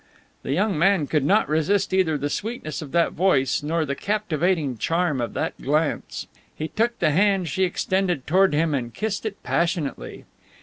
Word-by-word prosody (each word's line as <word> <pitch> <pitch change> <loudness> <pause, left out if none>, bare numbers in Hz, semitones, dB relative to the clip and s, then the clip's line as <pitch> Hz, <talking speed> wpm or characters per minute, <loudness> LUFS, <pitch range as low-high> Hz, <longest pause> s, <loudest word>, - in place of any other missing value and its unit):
The - - -4
young 190 +2 +1
man 190 -2 +3
could 150 0 0
not 205 +9 +3
resist 185 +6 +1
either 175 -5 +2
the 145 - -2
sweetness 210 - -4
of 145 -3 -8
that 170 0 +2
voice, 150 -8 +2
nor 160 +2 -1
the 140 - -2
captivating 175 - -1
charm 165 +1 0
of 120 - -4
that - - -2
glance. 150 +3 -1 0.3
He 155 - -4
took 235 +2 0
the 155 - +2
hand 190 +2 +2
she 190 +6 +1
extended 180 -4 -1
toward 190 +5 +4
him 160 0 +1
and 120 -4 -2
kissed 215 0 -2
it 200 -2 -8
passionately. 165 - -2
170 Hz, 175 wpm, -23 LUFS, 150-195 Hz, 0.3 s, toward